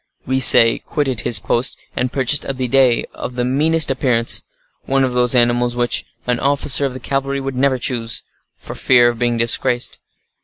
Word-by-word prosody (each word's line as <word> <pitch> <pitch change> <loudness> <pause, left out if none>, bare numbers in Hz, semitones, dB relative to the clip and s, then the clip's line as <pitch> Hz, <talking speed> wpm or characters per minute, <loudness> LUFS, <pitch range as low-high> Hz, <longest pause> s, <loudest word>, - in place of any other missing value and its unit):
we 130 +1 -1
say, 115 -3 +7
quitted 135 -7 -3
his 120 -3 +1
post 120 +4 -2 0.2
and 125 0 -2
purchased 135 +1 0
a 135 - -4
bidet 130 -1 +1
of 125 - -8
the 125 0 -2
meanest 155 +4 +1
appearance,—one 130 +1 -2
of 130 -1 -2
those 125 0 +2
animals 120 0 +1
which 120 0 -1 0.2
an 125 -1 -1
officer 140 0 +2
of 130 - -9
the - - -7
cavalry 135 +2 -3
would 135 -1 -6
never 130 0 +1
choose, 115 -2 -3 0.3
for - - -10
fear 120 -2 +3
of 120 -1 -6
being 120 -1 -1
disgraced. 120 +1 0
125 Hz, 175 wpm, -17 LUFS, 120-135 Hz, 0.3 s, say